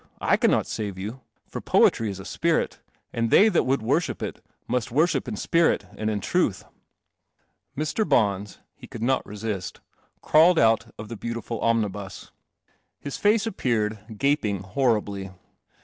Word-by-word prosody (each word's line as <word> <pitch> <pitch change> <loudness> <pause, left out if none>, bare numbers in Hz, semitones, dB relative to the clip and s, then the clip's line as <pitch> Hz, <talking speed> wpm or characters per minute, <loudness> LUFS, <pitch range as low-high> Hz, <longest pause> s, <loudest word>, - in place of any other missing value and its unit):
I - - +3
cannot - - +2
save 100 -3 -4
you. 110 +7 -6 0.3
For - - -6
poetry 115 -2 +3
is 95 -1 -6
a 95 - -9
spirit; - - 0 0.3
and 115 0 0
they 215 - +6
that 180 - +2
would 135 -3 +1
worship 145 +8 0
it - - -6 0.2
must 125 -1 -1
worship 155 +3 +1
in 115 - -3
spirit 165 +10 +2
and 110 0 -2
in 105 -2 -2
truth." 120 - 0 1.1
Mr. 155 +9 -1
Bons 100 -2 +1
— - - -56
he - - -11
could 115 - -7
not 130 +2 +1
resist 105 -3 -5 0.2
— - - -40
crawled 165 +3 +5
out 115 -3 +3
of 105 - -8
the 115 - -6
beautiful 115 0 -5
omnibus. 105 -4 -2 0.7
His 140 - -6
face 210 +1 +3
appeared, 110 - -2
gaping 110 -8 +1
horribly. 100 -3 -1
115 Hz, 155 wpm, -25 LUFS, 105-140 Hz, 1.1 s, they